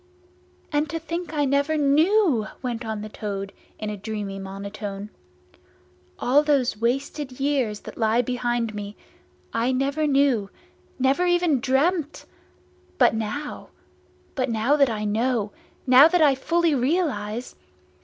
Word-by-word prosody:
"And 295 +1 +1
to 330 - -3
think 335 0 -5
I 295 -2 +1
never 280 +3 +1
knew!" 300 - +3 0.2
went 245 -1 -3
on 220 -2 -4
the - - -5
Toad 200 -2 -5 0.2
in 215 -1 -4
a - - -4
dreamy 205 -1 -5
monotone. 200 +1 -6 1.1
"All 270 +4 +3
those 280 -6 +1
wasted 255 +4 -2
years 265 -7 0
that - - -10
lie 225 +2 +2
behind 240 -2 -1
me, 205 0 -7 0.6
I 235 +3 +1
never 280 +4 0
knew, 270 -8 +2 0.5
never 270 +7 +2
even 350 -5 +2
dreamt! 290 +5 0 0.7
But - - +5
now—but 255 +2 -6
now 230 +5 +2
that 280 -3 +4
I 215 -2 -3
know, 220 0 0 0.3
now 260 +3 +8
that 350 0 +2
I 285 -2 +6
fully 330 +4 +1
realise! 250 - -1
255 Hz, 130 wpm, -24 LUFS, 215-295 Hz, 1.1 s, now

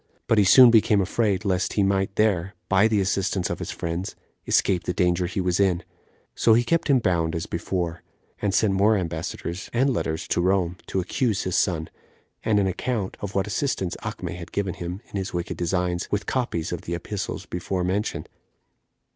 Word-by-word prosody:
But 110 - +3
he - - +6
soon 120 +5 +8
became 110 -2 +4
afraid, 105 +1 0
lest 95 -2 0
he 100 - +2
might 95 0 0
there, 100 -3 +1
by 95 +2 +4
the 110 -2 +1
assistance 95 -1 0
of - - -3
his - - -5
friends, 85 +4 -4 0.3
escape 90 -3 +2
the 90 - -2
danger 90 -1 +2
he 95 - -3
was 90 0 0
in; 95 -3 +2 0.5
so 115 - +4
he 120 - +3
kept 165 +7 +1
him 140 - +5
bound 85 -7 0
as 80 - -2
before, 85 0 -3 0.4
and 100 - +1
sent 100 0 +2
more 105 +3 +4
ambassadors 85 +1 -4
and 130 +3 +2
letters 80 -8 -2
[to - - +1
Rome] 90 -1 +1
to 95 - -1
accuse 105 +3 0
his 95 - -2
son, 80 -4 +1 0.6
and 105 -2 +2
an 100 - +2
account 95 +2 -2
of 100 -1 -6
what 95 0 +2
assistance 105 -5 -1
Acme - - -5
had 90 -1 -9
given 100 -3 -1
him 90 +4 -6
in - - -4
his 95 -1 -4
wicked 85 -1 -3
designs, 90 0 -1
with 105 0 -1
copies 120 -11 -2
of 90 - -3
the 85 - -4
epistles 95 +1 -5
before 90 +1 -3
mentioned. 95 +4 -2
95 Hz, 190 wpm, -24 LUFS, 90-105 Hz, 0.6 s, soon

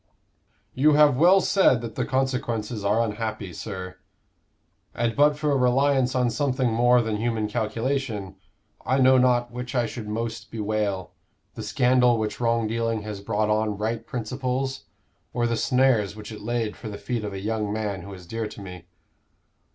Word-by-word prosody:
"You 150 +4 +4
have 150 -2 +6
well 180 +7 +6
said 160 - +3
that 115 -2 -6
the 125 - -2
consequences 125 -5 -1
are 105 +3 +2
unhappy, 110 -3 -4
sir. 95 -1 -7 1.0
And 115 -1 0
but 145 0 +4
for 150 0 0
a - - +2
reliance 130 0 +2
on 125 -2 +2
something 130 -3 0
more 120 +1 +4
than 110 -1 -2
human 110 -1 -1
calculation, 115 -2 -2 0.5
I 130 - +1
know 130 -1 +6
not 120 -1 +2
which 125 +2 -6
I 120 -1 +2
should 110 -1 -6
most 115 +1 -4
bewail 105 -4 -2 0.4
the 110 - -7
scandal 125 +1 +3
which 110 -1 -3
wrong 115 -1 +2
dealing 115 0 -1
has 105 -2 -6
brought 105 +1 0
on 105 -1 0
right 110 +2 -2
principles 130 +3 -3 0.5
or 120 -1 +1
the 115 0 0
snares 120 -4 +2
which 105 0 -9
it 110 - -8
laid 115 -1 -2
for 110 - -8
the 100 - -6
feet 120 0 -3
of 105 -1 -4
a 95 - -5
young 105 0 -2
man 105 -3 -3
who 100 +3 -10
is 90 -1 -12
dear 115 +4 -3
to 105 - -11
me. 90 -3 -9
115 Hz, 175 wpm, -25 LUFS, 105-125 Hz, 1.0 s, have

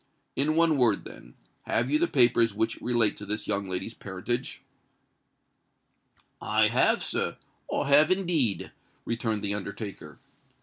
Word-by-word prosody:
In 150 +3 +1
one 165 -3 +3
word, 115 -5 +2
then—have 115 - -5
you 150 - +3
the 170 - +2
papers 120 -6 +3
which 110 +1 -1
relate 120 -3 +2
to 105 - -8
this 105 +1 -3
young 100 -2 -1
lady's 95 +5 -4
parentage?" 100 +4 -4 1.8
"I - - +2
have, - - +2
sir—I - - -4
have 145 +2 +6
indeed," 170 - 0 0.3
returned 115 -2 -2
the 100 0 0
undertaker. 100 0 -7
115 Hz, 125 wpm, -27 LUFS, 105-140 Hz, 1.8 s, have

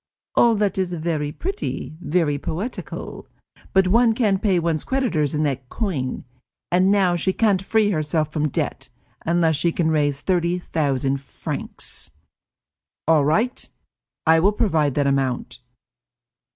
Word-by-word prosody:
All 235 -1 +5
that 205 -2 0
is 180 -1 -1
very 155 -3 -2
pretty, 385 - -4
very 150 -4 +1
poetical, 185 - -5 0.4
but 190 -1 +4
one 230 +3 +4
can't 205 -5 +1
pay 195 -4 +2
one's 165 -2 0
creditors 175 - 0
in 150 - +1
that 135 -4 -2
coin, 150 - -3 0.5
and 185 +2 +4
now 195 -3 +3
she 175 +3 0
can't 200 -2 +2
free 210 +1 +2
herself 155 -2 -1
from 150 -1 0
debt, - - -3 0.4
unless 165 -2 +3
she 170 +3 +1
can 165 -1 0
raise 145 -3 +1
thirty 175 0 +1
thousand 140 -5 -1
francs." 140 - -6 1.0
"All 160 -3 +5
right, 220 - 0 0.6
I 160 0 +6
will 200 +5 +3
provide 155 - +1
that 145 - +2
amount." 135 -3 -1
170 Hz, 140 wpm, -22 LUFS, 150-195 Hz, 1.0 s, I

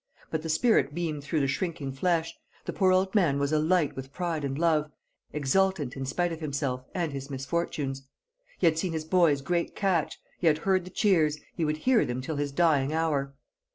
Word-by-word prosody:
But 160 - -1
the 160 - -5
spirit 155 - +2
beamed 160 -4 -3
through 150 +1 0
the 135 - +1
shrinking 150 -2 -2
flesh, 165 +4 0 0.3
the - - -4
poor 190 -2 +3
old 190 +1 +2
fellow 170 -10 +3
was 140 +1 0
alight 155 0 +2
with 135 0 -7
pride 170 -2 -2
and 135 -1 -2
love, 155 -2 +2 0.4
exultant 150 0 +1
in 135 -1 -4
spite 175 +5 0
of 160 - -7
himself 140 -4 -2
and 170 -5 -1
his 135 0 -6
misfortunes. 135 -1 -3 0.5
He - - 0
had 160 -1 +3
seen 180 -1 -1
his 160 -1 -3
boy's 160 -5 +3
great 170 +4 -1
catch; 185 -6 0 0.2
he 175 - +1
had 150 -1 +5
heard 185 +2 +1
the - - -8
cheers, 165 -7 +2 0.2
he 170 - -2
would 155 0 0
hear 250 +7 +3
them 125 +1 -3
till 145 +4 -4
his 145 -1 -1
dying 145 -3 +2
hour. 150 -4 0
155 Hz, 200 wpm, -28 LUFS, 140-175 Hz, 0.5 s, had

